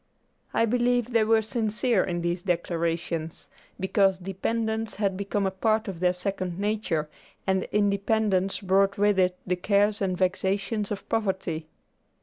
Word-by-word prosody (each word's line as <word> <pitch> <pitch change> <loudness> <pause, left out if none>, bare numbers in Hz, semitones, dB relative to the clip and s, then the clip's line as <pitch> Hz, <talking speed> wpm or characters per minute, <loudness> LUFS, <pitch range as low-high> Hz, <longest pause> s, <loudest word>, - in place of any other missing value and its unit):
I 230 - +2
believe 245 +1 +1
they 225 -2 +4
were 220 0 +3
sincere 220 -1 +1
in 175 -1 -2
these 175 +1 -1
declarations, 170 -2 -2 0.3
because 190 0 +2
dependence 220 +4 -2
had 200 -2 0
become 200 +1 -1
a 190 - +1
part 215 +3 +1
of 190 -4 -5
their 180 0 +3
second 180 -1 -3
nature, 200 -7 -1 0.4
and 190 -1 +1
independence 200 -1 +1
brought 195 +1 +2
with 205 -1 +3
it 180 0 +2
the 180 0 0
cares 205 +3 +2
and 185 -2 0
vexations 195 +3 0
of 205 - -5
poverty. 190 -7 -1
195 Hz, 140 wpm, -26 LUFS, 180-215 Hz, 0.4 s, they